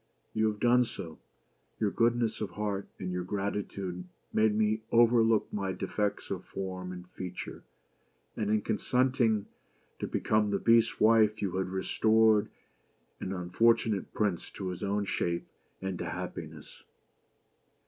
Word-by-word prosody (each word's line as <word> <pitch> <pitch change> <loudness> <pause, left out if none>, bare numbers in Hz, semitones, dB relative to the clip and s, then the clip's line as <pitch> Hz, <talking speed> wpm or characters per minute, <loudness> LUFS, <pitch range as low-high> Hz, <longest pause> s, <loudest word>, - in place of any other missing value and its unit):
You 110 0 +2
have 105 -1 -2
done 120 +2 +5
so; 85 -8 -7 0.6
your 105 -2 +1
goodness 115 0 +1
of 105 - -2
heart, 100 +1 -3
and 90 -1 -4
your 90 0 -2
gratitude, 95 -2 -3 0.3
made 110 -1 +3
you 110 0 +1
overlook 115 -2 +4
my 95 -2 -1
defects 105 +2 -2
of - - -3
form 95 -1 -5
and 90 -1 -9
feature; 90 -1 -6 0.7
and 105 -2 -1
in 105 -1 +2
consenting 120 -2 +1 0.5
to - - -2
become 105 -1 +1
the 100 - +1
Beast's 115 +1 +3
wife, 110 -1 +5
you 100 -3 -1
have 95 -1 -1
restored 110 +2 +3 0.7
an 95 - -4
unfortunate 100 +3 +1
prince 100 -6 -1
to 95 -2 -4
his 90 - -6
own 100 +1 0
shape, 85 -3 -1 0.4
and 95 -2 -3
to - - -3
happiness." - - -7
105 Hz, 140 wpm, -30 LUFS, 95-110 Hz, 0.7 s, done